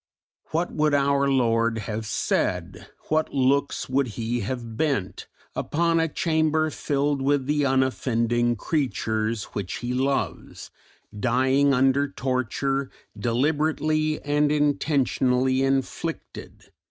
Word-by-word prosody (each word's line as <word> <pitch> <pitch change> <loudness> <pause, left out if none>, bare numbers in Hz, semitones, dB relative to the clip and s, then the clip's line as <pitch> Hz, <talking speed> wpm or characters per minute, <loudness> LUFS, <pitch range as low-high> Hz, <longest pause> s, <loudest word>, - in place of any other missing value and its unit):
What 170 +3 -2
would 150 -1 +2
our 140 0 +2
Lord 115 -3 +2
have 110 +1 -4
said, - - -2 0.2
what 155 0 +1
looks 140 +1 +1
would 130 +1 +1
He 120 +1 -1
have 115 +1 -5
bent, 135 -9 -2 0.3
upon 165 +1 +1
a 165 - +2
chamber 155 0 +1
filled 145 -1 -1
with 140 0 +1
"the 145 +1 +1
unoffending 120 -3 +1
creatures 110 -6 -1
which 100 -3 -4
He 120 +1 -3
loves," 135 +2 -2 0.5
dying 130 +4 +3
under 135 +2 +3
torture 135 +1 -2 0.3
deliberately 155 +6 0
and 145 0 +2
intentionally 135 -3 +1
inflicted? 135 -1 -3
135 Hz, 105 wpm, -25 LUFS, 120-145 Hz, 0.5 s, dying